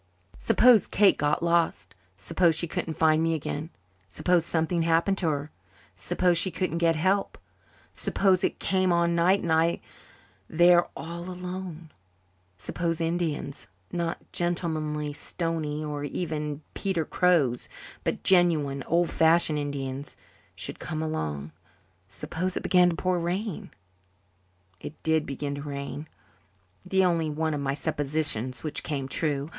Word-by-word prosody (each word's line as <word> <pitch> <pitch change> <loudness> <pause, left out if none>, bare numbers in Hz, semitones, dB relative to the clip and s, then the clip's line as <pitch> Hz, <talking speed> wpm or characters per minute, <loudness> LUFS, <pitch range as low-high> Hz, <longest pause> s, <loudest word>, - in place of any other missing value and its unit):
Suppose 240 -4 +5
Kate 200 -1 +4
got 150 +3 0
lost 170 -9 +1 0.2
suppose 160 - +2
she 170 - +1
couldn't 160 -1 -4
find 160 -1 +3
me 165 0 +1
again 155 +1 -4 0.4
suppose 170 - +1
something 165 +1 0
happened 165 +4 +2
to 170 - +1
her 145 0 -3 0.4
suppose 170 - +1
she 190 - +2
couldn't 180 -1 -2
get 165 -1 +3
help 190 +5 0 0.6
suppose 190 -1 +1
it - - 0
came 185 -1 +1
on 170 0 +2
night 180 +4 +3
and 170 - -1
I 165 +1 +3 0.7
there 175 +1 +5
all 170 +2 -6
alone 180 -3 -7 0.7
suppose 165 - -2
Indians 165 -4 -2 0.2
not 170 -1 -2
gentlemanly 155 -4 -1
Stoneys 155 -1 -3
or 145 -1 -4
even 150 -1 -3
Peter 185 -5 -1
Crows, 155 -10 +2 0.3
but - - -2
genuine, 160 -7 +3
old 170 0 +2
fashioned 160 -1 +4
Indians 140 -1 -5 0.4
should 95 +1 -6
come 160 -2 -4
along 75 - -3 0.6
suppose 180 - -3
it - - -4
began 180 -1 +5
to 170 - -2
pour 180 +1 0
rain! 180 +3 -3 1.1
It 155 - -8
did 160 -1 +1
begin 140 +1 -3
to 140 - -5
rain, 140 +1 -6 0.8
the 190 -1 +2
only 165 -3 +1
one 155 +1 -1
of 145 - -2
my 140 0 -1
suppositions 140 -4 -2
which 155 - -4
came 140 -3 -3
true. 145 0 -1
165 Hz, 135 wpm, -27 LUFS, 150-175 Hz, 1.1 s, Suppose